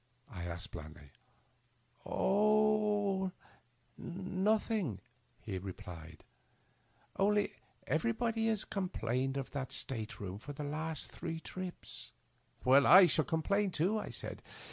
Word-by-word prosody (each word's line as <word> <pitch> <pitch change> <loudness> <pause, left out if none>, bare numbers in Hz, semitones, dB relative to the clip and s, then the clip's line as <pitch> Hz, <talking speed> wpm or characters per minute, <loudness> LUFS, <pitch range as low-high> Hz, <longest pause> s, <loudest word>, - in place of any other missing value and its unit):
" - - -39
I 90 -5 -5
afiked, 85 0 -5
blandly, 75 -2 -10 0.4
" - - -36
Oh 210 -2 +3 0.4
— 120 0 -39
nothing," 190 - 0 0.4
he 95 - -3
answered; 90 -4 -8 0.5
" - - -29
only 205 +1 +3 0.3
everybody 230 -1 +1
has 220 -3 0
complained 135 - -1
of 135 - -4
that 135 -2 -4
state 115 -4 -4
room 100 -1 -5
for 145 +6 -7
the 145 - -5
last 155 +2 -3
three 165 -2 -4
trips." 185 +2 -7 0.3
" - - -26
I 140 +8 +9
shall 155 -3 +3
complain 200 +7 +1
too," 185 +6 +1
I - - -5
said. - - -5
160 Hz, 125 wpm, -34 LUFS, -, 0.5 s, I